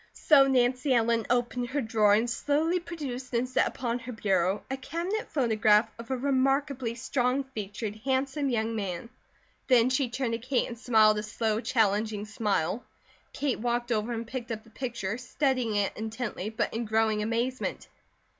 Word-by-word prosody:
So 275 -3 +6
Nancy 255 +1 +2
Ellen 230 -1 +2
opened 245 0 0
her 285 +3 -1
drawer 220 -3 +3
and 225 +3 +1
slowly 300 +8 +1
produced 270 -8 -6
and 240 +2 +1
set 255 - +2
upon 240 -1 -3
her 240 +1 -7
bureau 195 -3 0
a - - 0
cabinet 340 +10 -3
photograph 220 -5 +3
of 230 - -9
a 260 - 0
remarkably 270 -2 +1
strong 250 +2 0
featured, 215 -4 -5
handsome 270 +4 -1
young 225 -2 0
man. 195 0 -4 0.6
Then 250 -1 +5
she 260 -1 +1
turned 240 -1 -2
to 230 - -1
Kate 255 +2 0
and 235 -1 -8
smiled 215 -3 +4
a - - -2
slow, 215 +1 -1
challenging 215 -2 +1
smile. 210 -1 -1 0.5
Kate 275 -3 -1
walked 240 +1 -1
over 220 +1 0
and 230 0 -3
picked 235 0 -6
up 220 -1 -4
the 225 - -20
picture, 235 -4 -4
studying 255 -3 0
it 205 -1 +1
intently 220 -2 -4
but 220 - -2
in 230 +1 -2
growing 220 0 +1
amazement. 235 +4 -2
235 Hz, 165 wpm, -28 LUFS, 220-260 Hz, 0.6 s, So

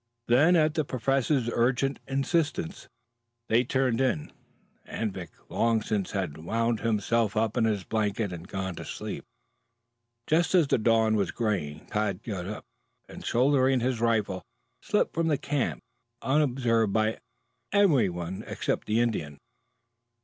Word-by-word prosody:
Then, 145 +9 +5
at 155 -2 +3
the 155 -1 +1
Professor's 135 0 0
urgent 130 +3 +1
insistence, 160 +5 -1 0.6
they 115 +2 +4
turned 130 -1 +1
in. 125 - 0 0.6
Anvik 95 -6 -4 0.2
long 115 -2 +1
since 105 -4 -1
had 85 -6 -3
wound 115 +6 0
himself 110 0 0
up 110 0 +1
in 120 -2 +2
his 105 -4 0
blanket 105 -1 -1
and 85 +1 -8
gone 95 -1 -3
to - - -6
sleep. - - -6 1.0
Just 170 +4 +2
as 175 -4 +6
the - - +3
dawn 110 0 +3
was 100 -2 +1
graying, 90 -10 -2
Tad 105 -1 -2
got 95 -6 -4
up, 105 - -6 0.4
and - - -10
shouldering 130 +1 +3
his 125 -1 -1
rifle 105 -5 +1 0.4
slipped - - 0
from 165 0 0
the 150 -3 +2
camp 135 - -2 0.4
unobserved 125 -6 +2
by 110 +1 +1 0.5
anyone 95 - +2
except - - -2
the 110 +2 +2
Indian. 90 -12 -1
115 Hz, 135 wpm, -28 LUFS, 100-135 Hz, 1.0 s, as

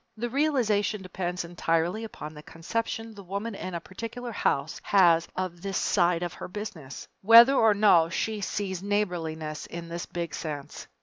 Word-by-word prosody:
The 240 +1 -3
realization 230 -8 +1
depends 180 -1 -4
entirely 170 +4 0
upon 155 -8 -8
the 150 - -10
conception 225 +8 -4
the 205 - -11
woman 200 +4 -4
in 185 -2 -6
a - - -2
particular 230 +7 -7
house 145 -7 -1
has 170 -4 +4
of 180 -2 -4
this 195 0 -2
side 175 -2 +2
of 175 - -4
her - - -7
Business 180 -8 -7
whether 230 +6 +9
or 225 -5 +4
no 180 -6 +5
she 215 +4 -2
sees 190 -2 -3
neighborliness 165 -7 -2
in 170 0 -7
this 170 0 -5
big 170 -2 -4
sense. 145 -3 -6
185 Hz, 165 wpm, -27 LUFS, 170-215 Hz, -, whether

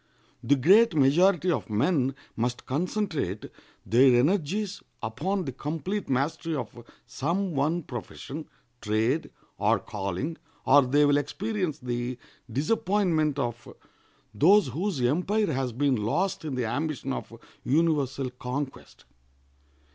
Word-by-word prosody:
The 145 - +4
great 190 - +5
majority 175 +6 +4
of 115 - -2
men 135 - +1 0.2
must 120 +2 -2
concentrate 155 - -2 0.4
their 125 +1 +5
energies 195 +7 0 0.2
upon 180 - -2
the 135 - -3
complete 165 - -4
mastery 150 +5 -1
of 125 -6 -4 0.3
some 175 +6 -2
one 155 +5 0
profession, 135 +4 -7 0.3
trade, 110 +8 0 0.3
or - - +3
calling, 105 - -4 0.3
or 145 - +7
they 145 +3 +4
will 145 0 +4
experience 185 +2 -2
the 120 -1 -3 0.3
disappointment 160 - +1
of 120 -3 -3 0.6
those 195 - +5
whose 180 -1 -2
empire 180 - +1
has 130 -1 -1
been 135 +2 +1
lost 175 - -1
in 145 -4 -3
the 125 -2 -1
ambition 145 +2 -2
of - - -6 0.3
universal 140 -3 +1
conquest. 130 +2 -6
145 Hz, 115 wpm, -27 LUFS, 125-175 Hz, 0.6 s, or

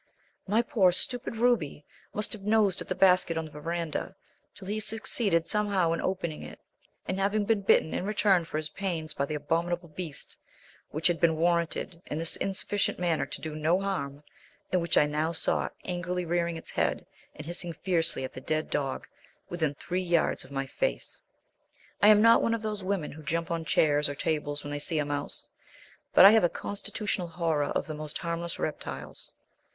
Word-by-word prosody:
My 220 +4 +3
poor, 195 -6 +4
stupid 235 +6 -1
Ruby 220 - +1 0.3
must 210 - -1
have 215 - -8
nosed 210 -2 +2
at - - -7
the - - -2
basket 180 -3 +4
on 160 - -2
the 155 - -11
verandah 165 +4 -3 0.4
till 190 - -11
he 210 +2 -1
succeeded 215 -4 +1
somehow 200 -5 +1
in 165 - -1
opening 170 -4 -2
it, - - -9 0.5
and 190 - -2
have 200 +1 +1
been 215 -1 +1 0.2
bitten 175 -4 +3
in - - -1
return 200 -3 +3
for 160 - -4
his 155 -1 -1
pains 165 -6 -3
by 140 - -1
the 155 - -4
abominable 170 +3 -1
beast 155 -2 -5 0.5
which 155 +2 -5
had 175 -2 +3
been 165 -2 +4
warranted 170 +1 0
in 150 - -3
this 165 0 +1
insufficient 195 +1 -1
manner 170 -3 0
to - - -6
do 155 -1 -5
no 160 +4 +2
harm, 150 -8 -3 0.5
and 180 - +2
which 170 - +1
I - - +6
now 155 +3 -1
saw 160 - +1 0.2
angrily 180 0 -2
rearing 170 0 0
its 160 - -8
head - - 0 0.3
and 155 - -8
hissing 175 +1 -3
fiercely 165 -3 0
at 130 - -5
the 130 - -8
dead 155 +3 -2
dog 135 -2 -2 0.4
within 160 -5 -1
three 180 +5 -2
yards 175 -2 +1
of 130 - -14
my 135 -1 -2
face. - - -3 0.8
I 205 - +7
am 210 0 +7
not 230 0 +7
one 230 - +2
of 225 - -4
those 210 -2 -3
women 185 -5 -1
who 155 - -10
jump 165 +4 -2
on 165 -1 -2
chairs 150 -2 +3
or 145 - -4
tables 145 -1 -2
when 145 - -6
they 145 - -3
see 160 +2 -1
a 150 - +1
mouse, 145 0 -2 0.6
but - - +8
I 200 - +11
have 220 -2 +5
a 175 - +4
constitutional 205 -1 -3
horror 165 -3 0
of - - -1
the 155 - -5
most 150 0 -5
harmless 170 0 -3
reptiles. 155 - -5
170 Hz, 195 wpm, -29 LUFS, 155-195 Hz, 0.8 s, I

